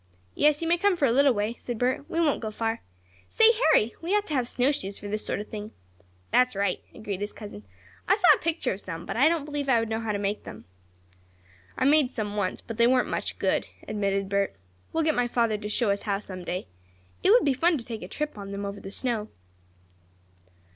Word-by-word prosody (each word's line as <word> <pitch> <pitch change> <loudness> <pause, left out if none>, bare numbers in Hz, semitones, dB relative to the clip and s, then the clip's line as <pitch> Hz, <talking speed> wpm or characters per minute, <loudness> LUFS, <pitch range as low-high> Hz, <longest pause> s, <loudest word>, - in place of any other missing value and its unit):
"Yes, 300 +1 +3
you - - -1
may 345 +1 +2
come 400 0 +3
for 290 - +3
a 245 - +3
little 275 +3 +5
way," 215 0 -1
said 240 -2 -5
Bert. 255 +4 -1
"We 330 - -1
won't 310 -4 +2
go 220 - -3
far. 225 +1 -2 0.5
Say, 450 0 +6
Harry, 315 - +3
we 350 +5 0
ought 415 - -1
to 310 - -5
have 255 -4 +1
snowshoes 245 -6 0
for 205 - -8
this 210 +1 -2
sort - - -2
of 210 - -7
thing." 215 0 -7 0.6
"That's 250 -3 +3
right," 200 -2 0
agreed 205 -3 -5
his 205 - -3
cousin. 155 - -10 0.4
"I 385 - +5
saw 400 -4 +2
a - - -1
picture 330 -7 0
of 190 - -8
some, 170 -1 -6
but - - -4
I 275 +7 +5
don't 330 -4 -1
believe 290 -2 -3
I 240 -3 +5
would 225 -1 -2
know 220 0 -1
how 225 -1 -2
to 205 - -1
make 200 +1 -2
them." - - -10 1.1
"I - - +1
made 290 -2 +5
some 210 -4 -3
once, 200 -3 -1
but 230 - -7
they 235 0 +5
weren't 255 0 +3
much - - -3
good," - - 0 0.2
admitted 195 -2 -1
Bert. 200 - 0 0.4
"We'll 325 - +1
get 310 0 +3
my 245 -2 +1
father 230 -3 +1
to 210 0 -5
show 215 0 +1
us 200 - -1
how 200 -3 -1
some 185 -3 -8
day. 180 +1 -3 0.6
It - - +3
would 475 +4 +6
be 280 - +3
fun 330 +5 +2
to 235 - -8
take 225 -2 -6
a 180 - -6
trip 300 0 -4
on 200 0 -7
them 200 0 -4
over 200 0 -5
the 195 - -8
snow." 225 -2 -1
230 Hz, 235 wpm, -27 LUFS, 205-290 Hz, 1.1 s, Say